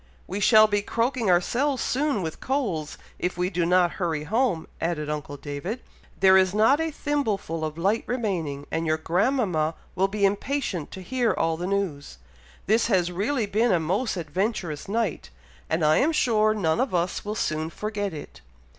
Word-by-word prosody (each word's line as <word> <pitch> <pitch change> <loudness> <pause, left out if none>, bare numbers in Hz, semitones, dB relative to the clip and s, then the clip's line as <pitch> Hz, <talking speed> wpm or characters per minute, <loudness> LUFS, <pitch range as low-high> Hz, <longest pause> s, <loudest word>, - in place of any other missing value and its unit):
"We 190 +3 -4
shall 215 +1 +7
be 205 -1 +1
croaking 230 +1 0
ourselves 250 +10 +2
soon 270 -7 0
with 160 -1 -5
colds, 200 - -2 0.2
if 180 - -2
we 180 +1 0
do 170 -2 0
not 180 -1 +4
hurry 160 -4 -1
home," 215 - 0
added 150 -3 -1
uncle 145 -1 -5
David. 145 - -5 0.4
"There 190 -1 +7
is 190 +1 +3
not 245 +8 +4
a 325 - 0
thimbleful 225 - -2
of 155 0 -3
light 200 +6 +1
remaining, 175 - -2
and 165 0 -1
your 155 0 +2
grandmama 175 - +1 0.2
will 190 +1 +2
be 200 0 0
impatient 205 - -1
to 190 - -7
hear 245 +3 +1
all 165 0 0
the 175 +2 -4
news. 190 - -2 0.5
This 220 +3 +3
has 180 -5 +2
really 220 +7 0
been 215 +3 +1
a 180 - +3
most 190 +8 -1
adventurous 175 -1 -2
night, 215 -4 -2 0.4
and 160 0 +1
I 155 +1 +5
am 305 +4 +3
sure 215 -6 +3
none 165 -4 +1
of 255 -8 -1
us 175 +1 -1
will 210 +1 -4
soon 155 -4 -1
forget 205 +1 -3
it." 145 - -10
190 Hz, 175 wpm, -25 LUFS, 165-225 Hz, 0.5 s, shall